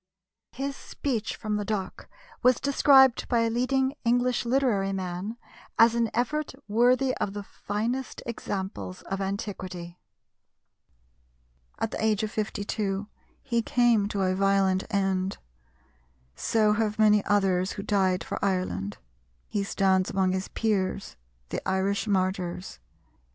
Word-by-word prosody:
His 275 +1 -3
speech 235 -7 -3
from 210 -1 -2
the 205 - -2
dock 205 -3 -4 0.3
was 250 -1 +4
described 270 -2 +5
by 235 -2 +2
a 230 0 +1
leading 265 +3 +1
English 245 +1 +2
literary 235 -6 +1
man 190 +3 -4 0.4
as 230 0 +6
an 235 -1 +1
effort 285 +4 -1
"worthy 250 +4 +3
of 195 - -2
the 205 0 -5
finest 230 +7 -4
examples 190 - -5
of 195 0 -4
antiquity." 185 -3 -5 1.8
At 225 - -2
the - - -3
age 220 -1 +2
of 215 - -2
52 205 -1 -2 0.3
he 235 -4 0
came 230 -3 +3
to 200 -2 -1
a 185 0 +2
violent 195 -1 +2
end.... 195 -1 0 1.0
So 215 -2 +2
have 210 -1 0
many 210 -1 +5
others 190 -2 +2
who 200 - -6
died 190 -3 +1
for - - -5
Ireland; 180 - -1 0.5
he 205 - -1
stands 190 -1 +2
among 190 -1 +1
his 190 0 -2
peers, 200 -3 -1 0.3
the - - -3
Irish 195 +3 0
martyrs. 185 - -1
205 Hz, 130 wpm, -27 LUFS, 190-235 Hz, 1.8 s, as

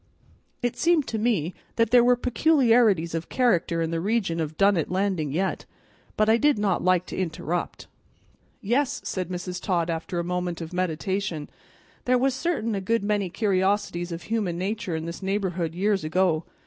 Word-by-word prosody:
It 245 - 0
seemed 335 -4 +3
to 220 - -2
me 200 -7 0 0.2
that 230 -1 +2
there 245 -1 +7
were 245 +1 +5
peculiarities 235 - +3
of 165 0 -4
character 175 -9 +1
in 165 - -2
the 165 - -1
region 195 -4 0
of 155 -1 -3
Dunnet 195 -5 +3
Landing 185 -5 0
yet, 185 +6 -2 0.5
but 215 - +3
I 220 +1 +5
did 290 +1 +3
not 205 -3 0
like 185 -1 +3
to - - -7
interrupt. 175 -1 -3 0.8
"Yes," 265 +6 0
said 185 -2 -3
Mrs. 180 0 -5
Todd 170 -3 0
after 165 +2 -4
a 170 - 0
moment 180 0 -2
of 165 0 -7
meditation, 180 -1 -2 0.5
"there 250 0 +3
was 265 +1 +2
certain 265 -6 -1
a 195 - -2
good 230 +3 0
many 205 -2 0
curiosities 190 -3 0
of 170 0 -5
human 205 -4 -1
natur' 190 -1 -2
in 160 0 -4
this 170 +3 -6
neighborhood 190 -4 -2
years 200 0 +1
ago. 160 0 +1
190 Hz, 175 wpm, -25 LUFS, 170-225 Hz, 0.8 s, there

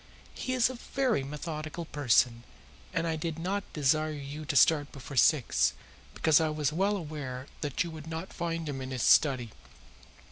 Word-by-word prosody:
He 255 - -3
is 250 -2 +4
a 255 - -5 0.2
very 255 - +2
methodical 155 +3 -5
person, 125 -5 +2 0.5
and 165 - -1
I 165 -1 0
did 160 0 -3
not 190 +4 -3
desire 155 +1 +2
you 145 +1 -7
to 145 - -2
start 145 +2 +4
before 140 +1 -9
six, 70 - +4 0.4
because 160 -1 +4
I 160 - +1
was 150 -1 -1
well 200 +5 +1
aware 145 -6 -6 0.2
that 145 -4 -1
you 170 - -6
would 155 -1 -9
not 165 +3 -6
find 165 -1 -3
him 135 -2 -4
in 130 - -5
his 130 -3 -2
study. 130 -6 +4
155 Hz, 175 wpm, -30 LUFS, 140-165 Hz, 0.5 s, is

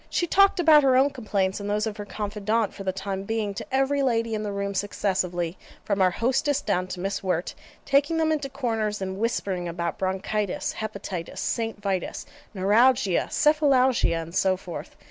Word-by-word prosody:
She 345 - 0
talked 395 +2 +4
about 315 -3 +7
her 265 -2 +4
own 275 +2 +4
complaints 200 -6 -1
and 200 0 -5
those 210 +1 0
of 220 -1 -4
her 205 - -6
CONFIDANTE 210 +1 -1
for 195 - -8
the 190 - 0
time 190 0 -4
being, 210 0 -2
to - - -6
every 270 +2 +2
lady 230 -3 +1
in 215 - -1
the 210 -1 -3
room 200 0 -3
successively, 185 -3 -1 0.3
from 200 -2 0
our 185 - +5
hostess 265 - +1
down 185 -10 -1
to 185 - -6
Miss 195 +2 -2
Wirt, 180 -2 -1 0.3
taking 285 +4 +2
them 320 -1 +2
into 295 -3 -1
corners, 225 -6 -2
and 190 0 -4
whispering 195 -6 -1
about 170 0 -3
bronchitis, 190 +1 -2
hepatitis, 200 -5 -5
St. 225 -3 -2
Vitus, 195 -3 -3 0.3
neuralgia, 205 +1 +3
cephalalgia, 265 - +3
and 165 +1 -11
so 190 0 +2
forth. 180 -2 -8
210 Hz, 180 wpm, -25 LUFS, 190-255 Hz, 0.3 s, about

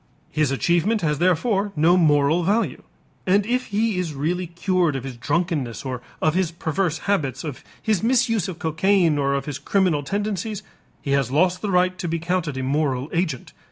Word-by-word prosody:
His 155 -3 +1
achievement 175 +10 +1
has 150 -3 0
therefore 195 +4 +1
no 160 +4 +4
moral 155 -1 +3
value, 205 +7 0 0.5
and 200 +2 +3
if 250 +3 -1
he 210 -1 0
is 165 -5 -3
really 175 +6 -1
cured 175 -2 0
of 135 - -4
his 135 -2 -6
drunkenness 145 -2 -2
or 125 -2 -4 0.2
of 155 - +3
his 185 -1 +1
perverse 165 0 -1
habits, 145 - 0
of 150 -5 -6 0.2
his 215 -5 0
misuse 230 -4 +2
of 185 -4 -6
cocaine 165 -1 +2
or 140 0 +1
of 140 - -2
his 145 -3 -5
criminal 185 -7 +1
tendencies, 205 +5 -3 0.4
he 140 - -2
has 140 -3 +2
lost 180 +6 +2
the 210 - -2
right 185 0 +2
to 175 - -3
be 165 0 -1
counted 165 -4 -2
a 130 - -2
moral 135 0 -1
agent. 165 -8 -2
170 Hz, 185 wpm, -23 LUFS, 145-190 Hz, 0.5 s, no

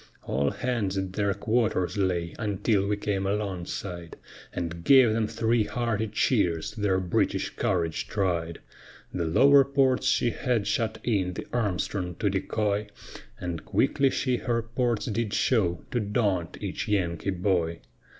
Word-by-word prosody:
All 70 +1 0
hands 110 - -2
at 95 -1 -3
their 100 0 +1
quarters 110 -6 0
lay, 90 -4 0
until 105 -1 +1
we 105 0 0
came 100 -2 -1
alongside, 95 -3 -4 0.3
And 85 -1 -4
gave 130 +1 +6
them 110 -1 +1
three 115 0 +1
hearty 115 -3 -1
cheers, 100 -6 +1
their 100 -3 0
British 90 -2 0
courage 85 -5 -1
tried. 85 -5 -1 0.5
The 85 - -1
lower 140 - +6
ports 135 -1 +2
she 120 - +2
had 120 -4 -1
shut 110 +2 0
in, 95 -6 0
the - - -5
Armstrong 95 -5 -1
to 100 0 0
decoy, 100 +2 -1 0.5
And 85 -2 -4
quickly 135 -1 +2
she 130 -1 0
her 115 -2 -1
ports 120 -1 -1
did 110 -2 -2
show, 95 -9 +1
to 125 - 0
daunt 100 -5 -1
each - - -4
Yankee 90 -3 0
boy. 90 -3 0
100 Hz, 140 wpm, -27 LUFS, 90-115 Hz, 0.5 s, gave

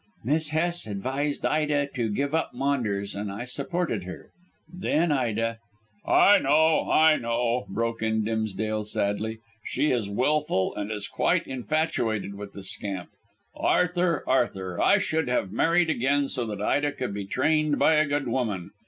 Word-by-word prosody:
"Miss 150 +5 0
Hest 170 -1 -1
advised 135 +8 -2
Ida 150 -2 +1
to 120 -4 -1
give 140 +8 -2
up 160 -5 -1
Maunders, 120 -7 -1
and 100 0 -4
I 105 +5 -5
supported 140 - -2
her. 95 - -9 0.4
Then 170 -2 0
Ida 115 -4 0 0.3
" 105 0 -37 0.2
"I 205 0 +7
know, 155 +3 +3
I 155 0 +5
know," 115 -1 -1
broke 115 +2 -2
in 110 -1 +1
Dimsdale 110 -1 -2
sadly. 105 +1 -2 0.3
"She 150 - 0
is 115 -5 -1
wilful 130 -3 +1
and 105 +1 -4
is 105 -1 -3
quite - - +1
infatuated 125 -7 -1
with 100 0 -9
the 100 - -9
scamp. 95 -2 -4 0.5
Arthur, 180 -2 +1
Arthur, 95 -8 0
I - - +5
should 160 -2 -1
have 110 -6 0
married 165 - +2
again, 140 +1 +1
so 125 -4 -2
that 105 -1 -4
Ida 145 +5 +1
could 125 -6 -4
be 100 -1 -4
trained 155 +6 +1
by 160 - +4
a 155 -1 +3
good 145 -2 -1
woman. 110 -8 -2
125 Hz, 160 wpm, -26 LUFS, 105-150 Hz, 0.5 s, I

